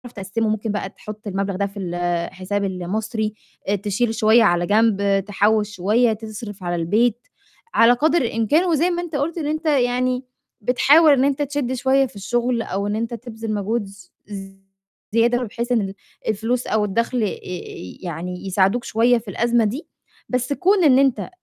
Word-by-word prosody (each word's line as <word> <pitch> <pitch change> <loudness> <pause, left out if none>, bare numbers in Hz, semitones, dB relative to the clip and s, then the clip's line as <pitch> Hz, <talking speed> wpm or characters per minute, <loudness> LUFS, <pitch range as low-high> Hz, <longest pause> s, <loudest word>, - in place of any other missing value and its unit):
تقسّمه. 220 +3 -2
ممكن 215 0 -1
بقى 200 -2 -3
تحُطّ 215 +2 -10
المبلغ 195 0 -2
ده 200 - 0
في 200 +1 -10
الحساب 175 +2 -2
المصري، 210 +4 -3 0.3
آآ 205 - +2
تشيل 210 +3 -1
شوية 220 +2 +5
على 175 -3 +3
جنب، 200 -3 +2
تحوِّش 210 +1 +1
شوية، 220 +5 +2
تصرِف 215 -2 -8
على 175 0 -1
البيت 220 - +1 0.5
على 230 +1 +6
قدر 315 +5 +2
الإمكان 240 - +1
وزي 335 0 +2
ما 345 0 -1
أنت 335 -4 -6
قُلت 310 +5 -1
إن 300 -3 -2
أنت 310 +2 -3
يعني 255 -2 +1 0.4
"بتحاول 290 +6 +5
إن 265 -1 +3
أنت 285 +1 0
تشدّ 285 -3 -1
شوية 265 +1 +2
في 225 - -19
الشُغل" 240 +4 0
أو 200 0 -3
إن 205 - -1
أنت 230 +2 -3
"تبذِل 225 -1 -5
مجهود 210 +2 -1
ز 195 -2 -15 0.2
ز 195 -2 -8 0.6
زيادة" 240 +2 +3
بحيث 235 +2 -4
إن 230 -3 +3
ال 195 0 -4 0.3
الفلوس 225 +4 -1
أو 210 -1 +1
الدخْل 230 +3 0
آآ - - +2
ي 180 - -7
يعني 180 +2 -5
يساعِدوك 195 +5 +2
شوية، 240 +2 +3
في 220 - -19
الأزمة 235 +2 +2
دي. 255 +10 -3 0.4
بس 250 +2 0
كُون 370 +4 +3
إن 265 -3 +6
أنت 270 -3 +1
220 Hz, 175 wpm, -21 LUFS, 200-250 Hz, 0.6 s, على